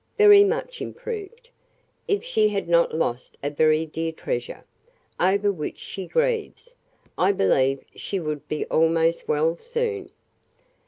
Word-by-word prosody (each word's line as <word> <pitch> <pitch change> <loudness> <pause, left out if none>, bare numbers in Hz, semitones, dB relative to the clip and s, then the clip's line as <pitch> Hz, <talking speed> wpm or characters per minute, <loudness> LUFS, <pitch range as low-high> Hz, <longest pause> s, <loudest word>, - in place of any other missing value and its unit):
"Very 415 -1 +8
much 475 +3 -2
improved. 465 +2 -7 0.6
If 410 +1 0
she 475 - +2
had 200 -3 -2
not 170 0 +3
lost 125 -6 -3
a 145 - -1
very 155 +1 +3
dear 165 +1 -3
treasure, - - -5 0.5
over 200 +3 +2
which 155 -6 -5
she 190 -2 -7
grieves, 485 0 -1 0.5
I 185 +2 +4
believe 135 - +2
she 195 - -4
would 155 -3 -5
be 155 - -2
almost 165 +1 +1
well 160 +3 +1
soon." 470 -4 -3
190 Hz, 130 wpm, -24 LUFS, -, 0.6 s, Very